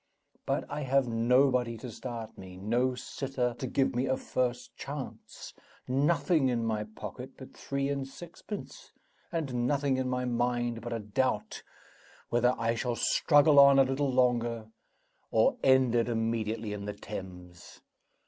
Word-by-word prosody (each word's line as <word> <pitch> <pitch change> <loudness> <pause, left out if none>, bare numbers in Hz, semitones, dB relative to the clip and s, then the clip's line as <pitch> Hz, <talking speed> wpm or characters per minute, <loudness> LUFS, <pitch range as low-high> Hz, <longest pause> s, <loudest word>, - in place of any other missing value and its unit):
But - - 0
I 150 - -4
have 135 -1 +2
nobody 120 +1 +2
to 120 +2 -8
start 115 -1 -7
me; 95 -1 -11
no 120 +6 0
sitter 125 -2 -3
to 130 - -3
give 135 +2 +1
me 125 +2 0
a 130 0 +1
first 125 -1 -2
chance; 140 -1 -8 0.3
nothing 145 +1 +2
in 115 -2 0
my 110 -1 -1
pocket 110 - -9
but - - -11
three 140 0 -2
and 140 -1 -2
sixpence; 175 +8 -9 0.4
and 130 -8 -1
nothing 140 -1 +1
in 130 -1 -1
my 125 0 -1
mind 120 -1 -1
but 120 +2 -6
a 115 - -1
doubt 105 +1 -1 0.7
whether 120 +1 +3
I 115 0 +1
shall 120 +1 -2
struggle 145 +3 +4
on 140 0 +8
a 135 - +7
little 135 +1 0
longer, 120 -3 +1 0.6
or - - +3
end 130 -2 +5
it 120 0 +2
immediately 115 -1 -1
in 100 -1 -6
the 105 - -4
Thames. 90 -4 -9
125 Hz, 150 wpm, -30 LUFS, 115-135 Hz, 0.7 s, on